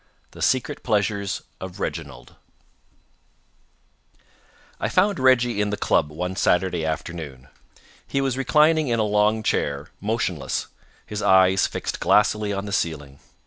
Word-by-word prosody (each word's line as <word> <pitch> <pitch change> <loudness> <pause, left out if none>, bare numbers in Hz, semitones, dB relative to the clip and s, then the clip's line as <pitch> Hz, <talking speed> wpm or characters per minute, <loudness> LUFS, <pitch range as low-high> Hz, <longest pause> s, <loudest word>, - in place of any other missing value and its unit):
THE - - -12
SECRET 130 +3 0
PLEASURES 100 -3 -1 0.2
OF 95 -1 -8
REGINALD - - -6 2.4
I - - -1
found 200 -5 +2
Reggie 125 -4 +3
in 105 - 0
the 105 - -2
club 75 - +1
one 90 +4 -4
Saturday 90 -2 +1
afternoon. 80 -5 -5 0.6
He 140 - -1
was 135 -2 0
reclining 155 +3 +3
in 120 -2 +1
a 110 - +2
long 105 +1 +2
chair, 70 -8 -1
motionless, 95 - -2 0.4
his 105 0 -5
eyes 95 0 +4
fixed - - -4
glassily 105 0 +2
on 100 0 -3
the 100 - -6
ceiling. 75 -6 -3
100 Hz, 130 wpm, -23 LUFS, 85-115 Hz, 2.4 s, eyes